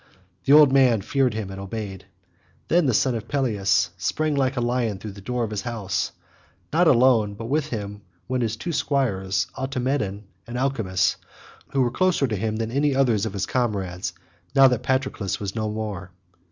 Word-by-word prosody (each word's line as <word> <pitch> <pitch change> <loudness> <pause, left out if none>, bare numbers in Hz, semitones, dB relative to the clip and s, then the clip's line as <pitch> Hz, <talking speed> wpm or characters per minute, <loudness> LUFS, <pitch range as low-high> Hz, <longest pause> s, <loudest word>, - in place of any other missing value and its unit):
The 140 - +5
old 150 -3 +8
man 125 -6 +4
feared 130 +1 +1
him 105 -3 -4
and 95 0 -7
obeyed. 100 -1 -6 0.6
Then 170 -3 +3
the 125 - +2
son 130 +3 +2
of 115 -1 -5
Peleus 100 - +1
sprang 155 +11 0
like 135 -2 0
a - - +2
lion 120 -3 0
through 105 +2 -7
the 100 0 -12
door 125 +4 -2
of 110 - -3
his 105 -2 -2
house, 105 -6 -2 0.6
not 170 +2 +4
alone, 120 -6 +4
but 115 - -7
with 145 +4 0
him 105 -5 -5 0.3
went 130 -1 -1
his 115 -2 -1
two 170 +10 -4
squires 110 -11 0
Automedon 130 -6 -2 0.2
and 120 +1 -5
Alcimus 110 -10 0 0.5
who 135 - +1
were 120 - 0
closer 185 0 +2
to 115 -5 -2
him 110 +2 -2
than 115 0 -3
any 140 +1 +1
others 115 -6 +2
of 105 - -6
his 100 - -1
comrades 100 -8 -2 0.4
now 135 -1 +8
that 125 -3 0
Patroclus 130 -7 -1
was 100 -2 -4
no 110 -1 -1
more. 105 -4 -5
115 Hz, 185 wpm, -24 LUFS, 100-135 Hz, 0.6 s, old